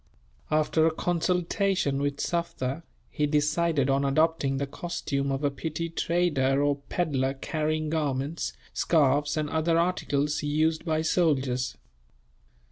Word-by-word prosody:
After 155 +1 +3
a - - +2
consultation 175 -2 0
with 145 0 -1
Sufder, 165 -4 -2 0.3
he 150 -1 0
decided 150 0 +1
on 135 0 +2
adopting 140 -1 +2
the 140 - -1
costume 140 -2 -3
of 135 +2 -2
a 145 - +2
petty 160 +4 -4
trader 150 -5 +1
or 145 -1 +2
pedlar 135 -6 0
carrying 155 +2 -2
garments, 145 0 -1 0.2
scarfs, 145 -1 +2
and 155 -1 0
other 160 +1 +2
articles 150 -4 0
used 155 +2 0
by 160 -1 0
soldiers. 135 -7 +1
150 Hz, 125 wpm, -27 LUFS, 140-165 Hz, 0.3 s, After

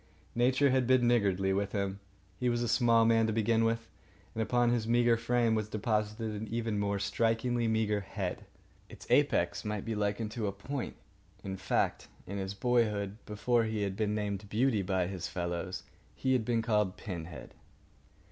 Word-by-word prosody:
Nature 130 +3 +3
had 130 -2 +2
been 130 -2 +4
niggardly 100 -5 +2
with 100 +1 -1
him. 100 -1 -2 0.4
He 125 - +1
was 120 0 0
a - - -1
small 115 0 +4
man 115 -1 +4
to 110 - 0
begin 115 +1 +2
with; 115 0 0 0.5
and 110 - -2
upon 120 +2 +2
his 115 -2 0
meagre 120 0 +4
frame 115 0 +1
was 110 -1 -1
deposited 110 +1 -1
an 110 - -5
even 115 -1 -2
more 100 0 0
strikingly 115 +3 0
meagre 110 -2 +1
head. 100 - -5 0.4
Its - - -12
apex - - +2
might 105 -1 -3
be 115 - -2
likened 105 +1 -1
to 110 -3 -2
a - - 0
point. 125 +7 -5 0.5
In 95 -1 -4
fact, - - -1 0.2
in 100 +1 -5
his 95 +1 -4
boyhood, 105 -3 +1
before 115 +2 +1
he 110 -1 -1
had 100 -1 -2
been 105 0 0
named 100 -1 -3
Beauty 115 0 +2
by 95 -1 0
his 95 -1 -4
fellows, 85 +1 -3 0.3
he 130 - +1
had 125 -3 +2
been 115 -1 +1
called 105 -4 +1
"Pinhead." 90 -5 -7
110 Hz, 175 wpm, -31 LUFS, 100-120 Hz, 0.5 s, been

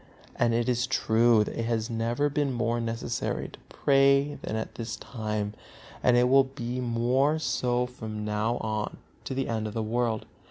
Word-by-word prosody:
And 115 -1 +2
it 120 0 +1
is 125 0 +1
true 115 -3 +4
that - - -6
it 115 - -1
has 115 -1 0
never 115 +4 0
been 145 -1 0
more 120 -1 0
necessary 115 0 -2
to - - -14
pray 140 +1 +3
than 110 - -4
at 110 - -4
this 115 -1 -5
time, 105 -3 -3 0.5
and 125 -1 +4
it 125 0 +5
will 135 +1 +6
be 125 -2 -5
more 125 +5 +2
so 125 -5 0
from 110 -4 -6
now 105 +3 0
on 110 -1 -2 0.3
to 130 - -3
the 135 - -1
end 110 -2 -1
of 105 - -7
the 110 - 0
world. 115 0 -1
120 Hz, 185 wpm, -28 LUFS, 110-130 Hz, 0.5 s, will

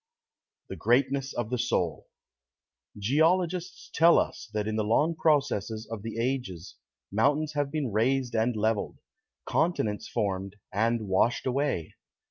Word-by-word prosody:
THE - - -5
GREATNESS 135 +2 +1
OF 120 -1 -3
THE 125 - -1
SOUL - - -1 0.9
Geologists 165 - +1
tell 170 +1 +6
us - - -1
that 105 -1 -2
in 110 - -1
the 110 - +1
long 150 +10 +2
processes 125 -9 0
of 115 -3 -4
the 115 +1 -6
ages 115 -8 -3 0.4
mountains 145 +8 +1
have 145 -1 0
been 145 -5 -2
raised 120 +3 +1
and 115 +2 +1
leveled, 110 0 -1 0.5
continents 110 -11 0
formed 95 -1 -2 0.2
and 115 +1 +1
washed 105 +5 +2
away. 130 - -1
120 Hz, 130 wpm, -28 LUFS, 110-145 Hz, 0.9 s, tell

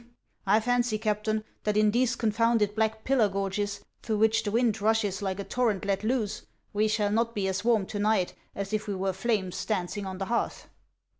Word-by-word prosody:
I 210 +3 +5
fancy, 245 -1 +1
Captain, 215 0 -1 0.2
that 210 0 0
in 215 0 +4
these 240 +1 +2
confounded 230 -2 +2
Black 220 0 0
Pillar 250 -6 +3
gorges, 200 +1 -2 0.2
through 220 -2 -1
which 220 +1 +3
the 210 - -2
wind 225 -1 +1
rushes 210 -3 +1
like 190 -1 -2
a - - -2
torrent 220 -4 0
let 195 0 0
loose, 220 -2 -1 0.3
we 210 +1 +2
shall 210 -1 +1
not 230 +2 +1
be 200 -2 0
as 190 +1 -1
warm 225 -4 +3
to 205 - -5
night 205 -3 +2 0.2
as 200 +1 -4
if 215 0 -1
we 200 - -2
were 190 0 -1
flames 195 -2 -1
dancing 200 -1 -2
on 190 0 -5
the 195 - -3
hearth." 235 +3 -2
215 Hz, 200 wpm, -28 LUFS, 200-225 Hz, 0.3 s, I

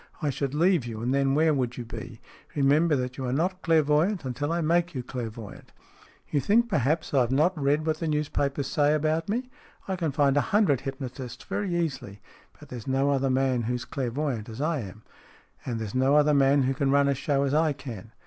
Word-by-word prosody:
I 150 -3 0
should 140 +1 -3
leave 170 -1 +3
you, 110 -2 -6
and 125 +2 0
then 135 0 +2
where 155 +1 +3
would 125 -3 -2
you 120 - -5
be? 115 0 -8 0.4
Remember 150 +3 +3
that 125 0 -3
you 130 - -3
are - - -1
not 180 +7 -1
clairvoyant 160 +3 +2
until 140 +4 -2
I 170 - 0
make 170 +1 +1
you 125 - -3
clairvoyant." 115 -4 -7 0.3
" - - -28
You 145 - +2
think, 225 - +3
perhaps, 155 - 0
I 140 - +4
have 120 0 0
not 155 +7 +2
read 145 +1 +1
what 155 -1 -1
the 165 - -2
newspapers 145 -2 -1
say 145 +2 +2
about 155 +3 0
me? 250 +4 -2 0.4
I 190 - -1
can 165 -4 -1
find 140 -1 +2
a - - +5
hundred 200 - +2
hypnotists 130 -2 -7
very 195 -4 -2
easily. 140 -12 -3 0.4
But - - -14
there 125 - -6
is 110 - -13
no 135 +2 +2
other 135 -1 +1
man 130 -1 +1
who's 125 +2 -3
clairvoyant 130 -3 -3
as 110 - -8
I 155 +1 0
am." 105 -1 -9 0.3
" - - -30
And 120 -3 -2
there 110 - -3
is 100 - -7
no 130 +2 +3
other 150 0 +4
man 140 0 +4
who 130 +1 +1
can 135 +1 0
run 140 0 +4
a 140 - +3
show 140 +1 0
as 140 0 0
I 155 0 +3
can. 120 -7 -8
140 Hz, 225 wpm, -26 LUFS, 130-155 Hz, 0.4 s, a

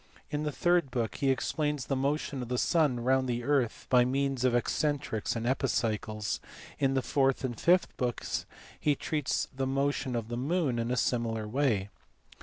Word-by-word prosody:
In 150 - -1
the 150 0 -1
third 175 -1 +2
book 120 -3 -2
he 135 - +1
explains 145 +2 0
the 135 - -1
motion 140 0 -1
of 125 - -5
the 125 +1 -1
sun 145 -5 +2
round 130 +1 +2
the 120 0 -1
earth 135 -4 0
by 125 -1 +5
means 135 0 0
of 130 -2 +3
excentrics 125 -3 0
and 115 0 -3
epicycles: 110 -4 -1 0.4
and 140 - +2
in 135 - +2
the 130 - +1
fourth 135 0 +1
and 125 -2 -2
fifth 180 +10 +3
books 125 -2 -2 0.3
he 150 -1 +2
treats 150 0 -1
the 135 0 -1
motion 135 -1 0
of 115 -2 -2
the 120 - -3
moon 140 -2 0
in 115 +1 -1
a 125 - 0
similar 115 -3 0
way. 110 -5 0
130 Hz, 185 wpm, -30 LUFS, 120-140 Hz, 0.4 s, by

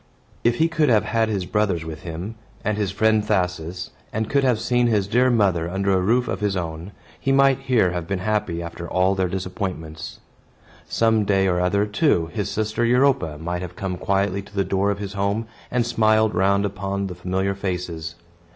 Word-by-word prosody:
If 120 0 +3
he 160 +6 +3
could 160 -3 +1
have 110 -3 +4
had 115 0 +1
his 100 -4 -1
brothers 95 -5 0
with 80 -1 -7
him, 85 +6 -6 0.3
and 110 - +1
his 105 -2 -1
friend 110 +2 +2
Thasus, 90 -3 -2 0.2
and 110 0 -2
could 140 -1 +3
have 125 -4 +2
seen 120 +1 +2
his 105 -4 +2
dear 125 +5 +3
mother 95 -8 +2
under 95 +2 0
a 95 - +2
roof 120 +6 +2
of - - -2
his 100 -3 0
own, 85 +1 -5 0.3
he 135 - 0
might 135 -1 +4
here 125 -9 +2
have 85 -2 -4
been 95 - -1
happy 90 -3 -1
after 85 0 -7
all 95 +1 +2
their 95 -1 0
disappointments. 90 -3 -5 0.7
Some 115 -1 +2
day 95 -1 +2
or 90 -2 +1
other, 100 +3 +2
too, 105 - +1
his 105 -3 -2
sister 110 +2 -1
Europa 125 - +2
might 85 +3 -3
have 90 -1 -7
come 95 -2 -3
quietly 100 +1 0
to 100 +1 -16
the 100 -1 +1
door 100 +1 +1
of 100 - 0
his 100 -1 -6
home, 100 +3 -1 0.2
and 120 -1 +1
smiled 110 -2 +3
round 100 +1 +2
upon 100 0 -3
the 95 - -4
familiar 95 +2 -1
faces. 90 -4 -4
100 Hz, 195 wpm, -23 LUFS, 90-110 Hz, 0.7 s, have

